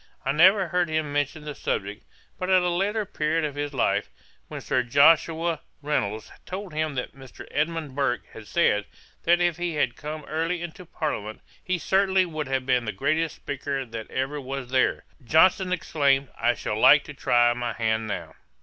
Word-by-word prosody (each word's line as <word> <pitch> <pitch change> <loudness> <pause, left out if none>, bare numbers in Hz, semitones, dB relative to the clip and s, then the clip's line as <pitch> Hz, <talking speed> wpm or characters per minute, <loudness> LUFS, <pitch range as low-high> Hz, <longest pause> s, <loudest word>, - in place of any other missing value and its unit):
I 135 - +2
never 185 +5 +5
heard 180 0 +1
him 155 -2 -1
mention 145 +1 -2
the 150 - -5
subject; 100 -6 -3 0.4
but 185 - -3
at 185 -1 +5
a 180 - +1
later 205 +5 0
period 155 -3 -1
of 145 - -3
his 145 0 -3
life, 135 - 0 0.4
when - - -6
Sir 130 - 0
Joshua 160 +5 +3 0.2
Reynolds 110 -8 -2
told 190 -2 -7
him 155 -1 -1
that 125 - -4
Mr. 135 -2 -12
Edmund 155 -1 -2
Burke 135 -3 0
had 110 -2 -11
said, 105 -12 +2 0.4
that 175 +1 +4
if 175 -2 +1
he 175 -2 -2
had 130 -5 0
come 150 +2 -7
early 165 +3 -2
into 175 +1 -8
parliament, 110 -11 -4 0.2
he 185 -1 -1
certainly 190 +1 +2
would 155 -4 -4
have 130 -1 -1
been 125 -2 +2
the 110 - -2
greatest 155 +10 0
speaker 140 -1 -4
that 115 -2 -8
ever 135 +3 -2
was 135 -1 -6
there, 130 -1 +2 0.2
Johnson 180 +7 +4
exclaimed, 140 -6 +1
'I 120 0 +1
should 105 0 -3
like 140 +5 +7
to 150 - -9
try 120 -3 +3
my 120 -1 -3
hand 110 -1 -1
now.' - - -5
150 Hz, 185 wpm, -25 LUFS, 130-170 Hz, 0.4 s, like